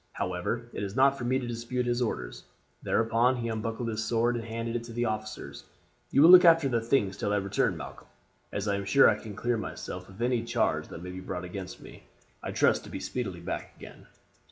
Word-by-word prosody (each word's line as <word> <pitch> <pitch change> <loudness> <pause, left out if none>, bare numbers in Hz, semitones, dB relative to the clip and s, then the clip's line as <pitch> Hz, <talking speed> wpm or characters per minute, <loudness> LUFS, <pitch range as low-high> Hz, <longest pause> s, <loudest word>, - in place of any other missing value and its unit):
However, 90 +6 -3
it - - -4
is 100 0 -4
not 135 +1 +5
for 120 - -5
me 130 +2 +2
to 130 - -3
dispute 120 +1 -3
his 120 0 0
orders;' 110 - -3 0.4
thereupon 115 +3 +2
he 115 -2 -3
unbuckled 115 +1 -3
his 110 -1 -2
sword 120 +1 +1
and 115 - -3
handed 115 +1 -4
it 120 - -2
to 115 - -9
the 120 +1 0
officers. 110 -1 -5 0.5
'You 140 - +5
will 170 - +9
look 185 0 +10
after 165 -4 +6
the 120 -3 0
things 110 -5 +1
till 100 - -1
I - - +2
return, 100 -1 0
Malcolm. - - -9 0.4
As 100 +1 -3
I 100 -1 +1
am 100 - -4
sure 135 +7 +6
I - - +3
can 105 -3 -9
clear 120 +2 0
myself 90 -3 -6
of 95 +2 -14
any 120 -1 +1
charge 115 - 0
that 85 - -9
may 90 - -6
be 90 - -7
brought 90 -1 -5
against 90 0 -7
me, - - -12 0.4
I - - -5
trust - - +2
to - - -10
be - - -5
speedily 95 -9 -4
back - - -5
again. - - -13
115 Hz, 225 wpm, -28 LUFS, 100-120 Hz, 0.5 s, look